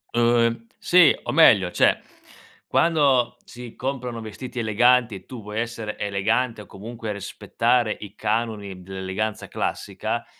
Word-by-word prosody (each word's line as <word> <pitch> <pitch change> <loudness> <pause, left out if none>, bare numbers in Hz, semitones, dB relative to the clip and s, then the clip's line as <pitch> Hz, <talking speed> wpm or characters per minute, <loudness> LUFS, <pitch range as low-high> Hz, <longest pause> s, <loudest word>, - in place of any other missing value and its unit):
Uhm, 115 -1 +2
sì, 175 -4 +6
o - - -3
meglio, 100 - +5
cioè - - +3 0.7
quando 135 -7 +2
si 120 -1 -11
comprano 125 -3 -4
vestiti 120 +3 -7
eleganti 120 +1 +3
e 95 - -11
tu 125 -3 -9
vuoi 105 +2 -5
essere 115 -2 -4
elegante, 105 +3 -1
o - - -12
comunque 110 +2 -7
rispettare 115 +3 0
i 105 -1 -10
canoni 105 -4 -2
dell'eleganza 95 +3 -4
classica, - - -3
115 Hz, 125 wpm, -23 LUFS, 105-125 Hz, 0.7 s, sì